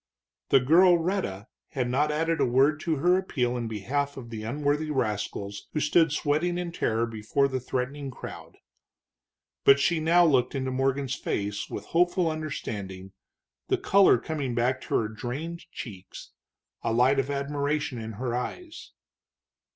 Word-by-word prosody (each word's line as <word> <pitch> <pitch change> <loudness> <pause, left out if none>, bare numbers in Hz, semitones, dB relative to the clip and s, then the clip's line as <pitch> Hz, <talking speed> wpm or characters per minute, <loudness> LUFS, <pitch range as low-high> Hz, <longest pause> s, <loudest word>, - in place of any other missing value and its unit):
The 135 - +6
girl 175 +7 +6
Rhetta 165 - -2 0.3
had 125 -2 -1
not 145 +5 +1
added 165 +2 0
a - - +3
word 135 +5 +3
to 160 0 -1
her 180 +6 +3
appeal 125 -10 -1
in 120 -2 -3
behalf 140 +7 -2
of 120 -3 -9
the 110 -1 -5
unworthy 145 +6 -1
rascals 105 -6 -3
who 150 - 0
stood 160 +1 +3
sweating 155 +4 0
in 175 -1 -3
terror 115 -8 0
before 115 +5 0
the 130 -1 -2
threatening 130 +3 -3
crowd. 130 - -10 1.1
But 140 0 +7
she 170 +4 +2
looked 160 -6 +3
now - - 0
into 130 -1 -2
Morgan's 135 0 0
face 100 -4 -3
with 105 - -6
hopeful 175 - +2
understanding, 100 -11 -5 0.6
the - - +2
color 200 0 +5
coming 145 -7 -3
back 125 +2 +1
to - - -3
her 110 - +2
drained 135 +10 -6
cheeks, 100 -5 -9 0.5
a 115 - -1
light 125 +4 +3
of 135 - -1
admiration 140 -1 -2
in 110 0 -6
her 120 +3 -3
eyes. 320 - -6
135 Hz, 155 wpm, -27 LUFS, 120-155 Hz, 1.1 s, But